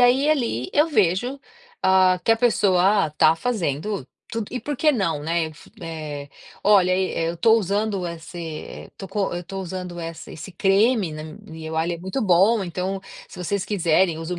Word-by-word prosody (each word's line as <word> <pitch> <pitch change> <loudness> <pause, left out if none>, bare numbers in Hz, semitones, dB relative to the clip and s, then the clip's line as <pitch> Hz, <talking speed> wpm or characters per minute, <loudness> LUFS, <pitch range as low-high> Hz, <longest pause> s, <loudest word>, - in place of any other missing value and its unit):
aí, 255 +4 +4
ali, 235 - 0
eu 300 +3 +4
vejo, 240 - +1 0.5
hã, 185 -1 +5
que 225 - +5
a 225 - +2
pessoa 200 -5 +3
está 155 +1 +3
fazendo 195 - -2 0.2
tudo 225 -2 -3
e 250 - -3
por 290 0 -4
que 305 +2 +4
não, 180 - -1
né? 165 +1 0
F 155 -1 -13
eh, 155 -4 -6 0.4
“Olha, 195 -3 +5
eh, 185 -3 0
estou 225 +6 +4
usando 200 -1 -1
esse, 170 +1 -8
eh, 160 -2 -7
tô 195 - -7
co 205 -3 -1
eu 175 - -3
estou 195 +2 -6
usando 180 -1 -6
essa 165 -1 -7
esse 160 +5 -9
creme 195 0 +2
na 155 0 -6
m 160 +1 -10
eu, 160 0 -5
ah, 160 - +2
ele 175 0 -1
é - - -8
muito 190 +9 -3
bom, 200 +4 +4
então 185 +2 -3 0.3
se - - -13
vocês 190 +2 -2
quiserem, 175 -3 +2
usa 165 +2 -4
o - - -6
185 Hz, 190 wpm, -23 LUFS, 165-210 Hz, 0.5 s, hã